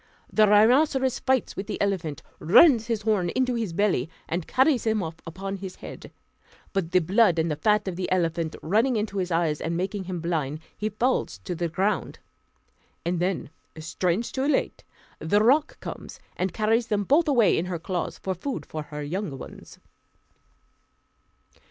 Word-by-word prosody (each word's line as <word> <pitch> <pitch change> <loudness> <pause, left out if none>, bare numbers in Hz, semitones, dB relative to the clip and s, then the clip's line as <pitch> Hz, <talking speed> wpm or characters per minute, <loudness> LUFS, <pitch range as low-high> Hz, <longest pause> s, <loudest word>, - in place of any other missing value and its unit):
The 215 -1 +5
rhinoceros 260 +5 +4
fights 260 -2 0
with 195 - -5
the - - -4
elephant, 180 -7 -2 0.2
runs 225 - +6
his 225 -3 -2
horn 205 -5 +1
into 255 -1 +1
his 225 -6 -2
belly, 175 -6 +1 0.2
and 170 0 -3
carries 265 -1 +3
him 220 -3 +1
off 160 0 -6
upon 195 +4 -5
his 190 -1 -7
head; - - -10 0.6
but 195 -5 -1
the 185 - +4
blood 185 +1 +3
and 160 0 +1
the - - 0
fat 210 +6 +1
of 180 -2 -3
the 185 - -3
elephant 165 -3 0
running 225 +10 +2
into 210 -2 -2
his 180 -1 -2
eyes 165 -3 0
and 165 +1 -2
making 190 +2 -3
him 180 -1 -4
blind, 155 -4 -2 0.2
he 215 - -2
falls 240 +5 0
to 180 - -4
the 170 0 -2
ground; 190 +4 -1 0.9
and 175 0 0
then, 180 -4 -2 0.3
strange 175 +6 -1
to 260 - -3
relate, 280 0 0 0.4
the 205 +7 +2
roc 290 +7 +3
comes - - -8 0.2
and 185 0 -1
carries 225 +5 +1
them 210 -3 0
both 310 - +3
away 240 -9 +4
in 165 - 0
her 180 -1 -3
claws, 175 +2 -3
for 190 - -3
food 260 +10 -5
for 155 - -5
her 150 0 -7
young 165 -1 -4
ones. - - -11
195 Hz, 175 wpm, -25 LUFS, 170-225 Hz, 0.9 s, runs